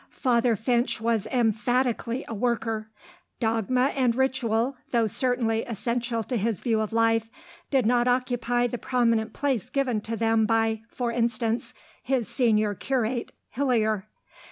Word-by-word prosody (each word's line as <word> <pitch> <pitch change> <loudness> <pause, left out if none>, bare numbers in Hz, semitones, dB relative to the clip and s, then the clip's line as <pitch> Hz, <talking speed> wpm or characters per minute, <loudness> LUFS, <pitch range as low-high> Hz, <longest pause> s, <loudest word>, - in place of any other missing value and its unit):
Father 240 -2 +2
Finch 240 +3 0
was 225 -2 0
emphatically 245 +1 0
a - - -5
worker. 225 -1 -1 0.5
Dogma 235 +3 +1
and 250 -4 +2
ritual, 260 -1 +1
though 235 -2 +2
certainly 225 0 +1
essential 235 +1 -2
to 245 +2 -2
his 220 0 -1
view 225 -3 +1
of 215 - -3
life, 225 0 +2 0.4
did 265 -4 +2
not 240 +1 +3
occupy 245 -1 +1
the 245 0 -3
prominent 230 -3 +1
place 260 -5 -1
given 255 -5 0
to 230 +2 -4
them 225 -1 +2
by, 225 -1 +1
for 240 -1 -2
instance, 235 +1 -1 0.3
his 255 -4 -1
senior 215 -5 +2
curate, 240 +1 -2 0.2
Hillier. 220 -6 0
235 Hz, 135 wpm, -26 LUFS, 225-250 Hz, 0.5 s, not